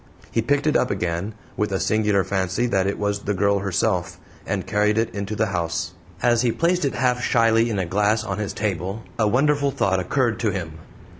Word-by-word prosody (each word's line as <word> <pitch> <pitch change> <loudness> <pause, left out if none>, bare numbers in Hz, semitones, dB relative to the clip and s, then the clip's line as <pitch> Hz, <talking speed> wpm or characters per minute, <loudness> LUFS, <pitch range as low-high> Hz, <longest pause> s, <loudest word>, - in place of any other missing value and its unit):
He 115 - +1
picked 145 +6 +1
it 155 - +2
up 125 - +2
again, 90 +2 -2 0.2
with 105 -1 -1
a 95 - 0
singular 105 -2 +2
fancy 95 +4 -1
that 95 -6 +1
it 100 - -1
was 100 0 -1
the 100 0 -2
girl 100 +1 +2
herself, 95 -3 -1 0.3
and - - -2
carried 105 +1 +1
it 115 0 0
into 100 +1 -4
the 110 - +1
house. 85 -2 -2 0.3
As 120 -1 +4
he 120 -2 +2
placed 175 +6 +1
it 140 - -1
half 125 0 +1
shyly 115 -1 +3
in 105 - -2
a 95 - 0
glass 105 +4 +1
on 100 -1 -4
his 105 -2 -2
table 100 +1 -3 0.2
a 110 - +3
wonderful 140 +5 +2
thought 95 -8 +1
occurred 115 +4 0
to 115 - +1
him. 80 -5 -5
105 Hz, 210 wpm, -23 LUFS, 95-115 Hz, 0.3 s, As